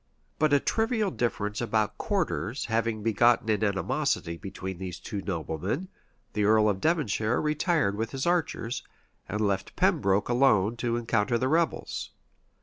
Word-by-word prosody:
But 155 Hz, -1 st, +3 dB
a 145 Hz, -, +5 dB
trivial 220 Hz, -, 0 dB
difference 105 Hz, -5 st, -2 dB
about 110 Hz, -2 st, 0 dB
quarters 170 Hz, -, -1 dB
having 115 Hz, -1 st, -1 dB
begotten 115 Hz, +1 st, +3 dB
an 110 Hz, 0 st, +1 dB
animosity 110 Hz, -, 0 dB
between 95 Hz, 0 st, -7 dB
these 90 Hz, -1 st, -5 dB
two 100 Hz, +2 st, -5 dB
noblemen, 95 Hz, -, -3 dB, 0.4 s
the 105 Hz, -, 0 dB
earl 110 Hz, +1 st, +5 dB
of 100 Hz, -2 st, 0 dB
Devonshire 125 Hz, -8 st, +1 dB
retired 150 Hz, -, +1 dB
with 110 Hz, +1 st, -2 dB
his 135 Hz, +2 st, -3 dB
archers, 165 Hz, -9 st, 0 dB, 0.5 s
and 105 Hz, +3 st, -2 dB
left 100 Hz, -2 st, -1 dB
Pembroke 100 Hz, +1 st, +2 dB
alone 120 Hz, -4 st, +3 dB
to 120 Hz, 0 st, -1 dB
encounter 115 Hz, 0 st, +1 dB
the 130 Hz, +2 st, 0 dB
rebels. 165 Hz, +2 st, 0 dB
115 Hz, 145 wpm, -28 LUFS, 100-140 Hz, 0.5 s, a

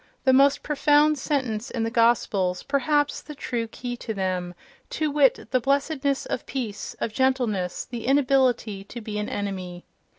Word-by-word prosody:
—the 260 Hz, -, +4 dB
most 275 Hz, +1 st, +4 dB
profound 300 Hz, +1 st, +3 dB
sentence 255 Hz, -5 st, -2 dB
in 230 Hz, -, -2 dB
the 225 Hz, -, -1 dB
Gospels, 215 Hz, -6 st, +2 dB
perhaps 290 Hz, +1 st, +1 dB
the 300 Hz, -, -10 dB
true 235 Hz, -4 st, -3 dB
key 245 Hz, +2 st, -6 dB
to 220 Hz, -2 st, -5 dB
them), 185 Hz, -2 st, -2 dB, 0.3 s
to 310 Hz, -1 st, -1 dB
wit, 280 Hz, -5 st, +3 dB
the 255 Hz, -, +3 dB
blessedness 280 Hz, +1 st, 0 dB
of -, -, -4 dB
peace, 230 Hz, -6 st, -4 dB
of 220 Hz, -, -2 dB
gentleness, 240 Hz, -8 st, 0 dB
the 240 Hz, -2 st, -6 dB
inability 260 Hz, -7 st, +2 dB
to 240 Hz, -, -8 dB
be 215 Hz, -2 st, -5 dB
an 210 Hz, -, -3 dB
enemy. 185 Hz, -3 st, -5 dB
245 Hz, 160 wpm, -25 LUFS, 210-275 Hz, 0.3 s, the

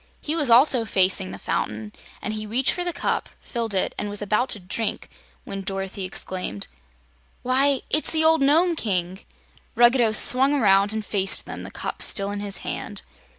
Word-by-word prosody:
He 305 Hz, -, -4 dB
also 265 Hz, -3 st, +5 dB
was 225 Hz, -, -5 dB
facing 190 Hz, 0 st, +2 dB
the -, -, -8 dB
fountain, 105 Hz, 0 st, -4 dB, 0.3 s
and 215 Hz, -, -3 dB
he 215 Hz, 0 st, -6 dB
reached 250 Hz, +5 st, +1 dB
for 355 Hz, -, -3 dB
the 350 Hz, -, -2 dB
cup, -, -, -3 dB
filled 230 Hz, -4 st, -4 dB
it, 190 Hz, -, 0 dB
and 205 Hz, -, -3 dB
was 205 Hz, 0 st, -3 dB
about 215 Hz, +5 st, 0 dB
to 210 Hz, -, -3 dB
drink 200 Hz, +4 st, -4 dB, 0.3 s
when 195 Hz, 0 st, -6 dB
Dorothy 195 Hz, 0 st, -5 dB
exclaimed: 185 Hz, -, -5 dB, 0.8 s
"Why, 265 Hz, +1 st, +2 dB
it's 310 Hz, -, +1 dB
the 320 Hz, -1 st, +2 dB
old 320 Hz, -1 st, +4 dB
Nome 330 Hz, +5 st, +3 dB
King!" 185 Hz, -, -2 dB, 0.6 s
Ruggedo 240 Hz, -1 st, +4 dB
swung 260 Hz, +6 st, +4 dB
around 200 Hz, -5 st, +3 dB
and 220 Hz, -1 st, -4 dB
faced 195 Hz, -2 st, +2 dB
them, -, -, -8 dB
the -, -, -8 dB
cup -, -, -6 dB
still 200 Hz, -2 st, +4 dB
in 205 Hz, -, -4 dB
his 200 Hz, -1 st, -4 dB
hand. -, -, -6 dB
215 Hz, 180 wpm, -23 LUFS, 195-265 Hz, 0.8 s, also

